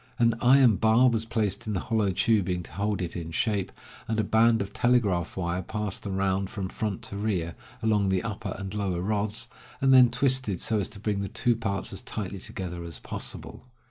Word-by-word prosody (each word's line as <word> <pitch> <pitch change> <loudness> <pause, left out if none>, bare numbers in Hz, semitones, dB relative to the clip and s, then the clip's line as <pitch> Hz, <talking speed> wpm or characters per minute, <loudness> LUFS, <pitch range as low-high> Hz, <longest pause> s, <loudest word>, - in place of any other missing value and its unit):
An 115 -2 +4
iron 125 -4 +6
bar 115 +3 +5
was 115 -1 -1
placed 110 -3 -1
in 105 - -1
the 95 - 0
hollow 110 -1 0
tubing 95 -2 +1
to - - -13
hold 100 -1 -1
it 85 - -5
in 85 -2 -5
shape, 100 +3 -1 0.4
and 110 -1 -1
a - - +3
band 115 +2 +4
of 100 0 -4
telegraph 105 -10 +1
wire 90 0 -1
passed 105 0 -3
round 95 0 0
from 100 -3 -4
front 105 -2 -3
to 100 - -6
rear, 95 -6 -1 0.3
along 105 -3 +2
the 95 -1 +1
upper 110 -3 -4
and 95 +1 -6
lower 100 -4 -1
rods, 105 +1 -1 0.3
and 135 -1 +4
then 125 -2 +8
twisted 125 -6 +1
so 110 -2 +1
as 95 - -1
to 105 - -10
bring 105 -1 -1
the 100 - -2
two 120 -1 +1
parts 110 -4 -2
as - - -5
tightly 100 -2 -5
together 90 -2 -5
as 85 -1 -7
possible. 130 - -6
105 Hz, 205 wpm, -27 LUFS, 95-110 Hz, 0.4 s, then